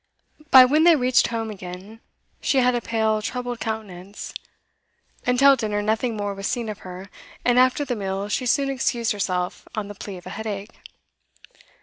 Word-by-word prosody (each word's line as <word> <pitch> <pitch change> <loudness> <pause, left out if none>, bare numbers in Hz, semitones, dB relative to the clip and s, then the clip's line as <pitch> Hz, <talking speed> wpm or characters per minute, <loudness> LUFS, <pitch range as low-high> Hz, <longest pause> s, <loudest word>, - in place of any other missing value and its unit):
By 260 -3 +10
when 300 +5 +3
they 340 -1 +7
reached 255 -2 +3
home 225 -1 -3
again, 190 +2 -9 0.4
she 275 - +1
had 250 -1 +4
a 240 - -1
pale 220 -1 0
troubled 245 +1 -4
countenance. 205 -3 -6 0.9
Until 275 +3 +6
dinner 210 -4 -2
nothing 220 +2 0
more 205 -1 -2
was 195 0 -4
seen 235 -3 -2
of 210 -1 -6
her, 185 +1 -10 0.3
and 245 0 +4
after 255 +3 +3
the 250 - -2
meal 195 -1 -3
she 250 +5 -1
soon 275 +3 +2
excused 245 -3 0
herself 180 -3 -2
on 210 -2 -3
the - - -6
plea 200 -1 -8
of 180 - -13
a 185 - -7
headache. 210 0 -5
220 Hz, 175 wpm, -23 LUFS, 200-250 Hz, 0.9 s, By